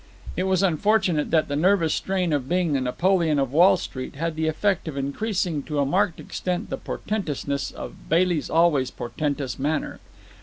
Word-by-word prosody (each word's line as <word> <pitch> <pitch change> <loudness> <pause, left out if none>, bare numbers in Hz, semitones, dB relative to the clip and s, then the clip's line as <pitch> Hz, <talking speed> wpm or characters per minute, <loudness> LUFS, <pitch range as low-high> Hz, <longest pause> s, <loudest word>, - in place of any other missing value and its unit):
It 185 - -1
was 190 0 +2
unfortunate 185 -3 +2
that 160 -1 +2
the 145 - -2
nervous 170 0 +3
strain 185 -4 -1
of 135 -3 -1
being 175 -3 +1
the 135 - +1
Napoleon 165 +4 +1
of 135 -2 0
Wall 175 +5 +6
Street 130 0 -6
had - - -12
had 165 -1 -1
the 160 0 -1
effect 190 +4 0
of 150 -3 -5
increasing 170 +3 -1
to 150 - -3
a 140 - +2
marked 185 +4 +1
extent 180 +3 -4
the - - -2
portentousness 145 -9 -3
of - - -10
Bailey's 170 -1 +2
always 160 -6 +3
portentous 140 +1 -3
manner. 150 +3 -2
160 Hz, 180 wpm, -24 LUFS, 145-185 Hz, -, Wall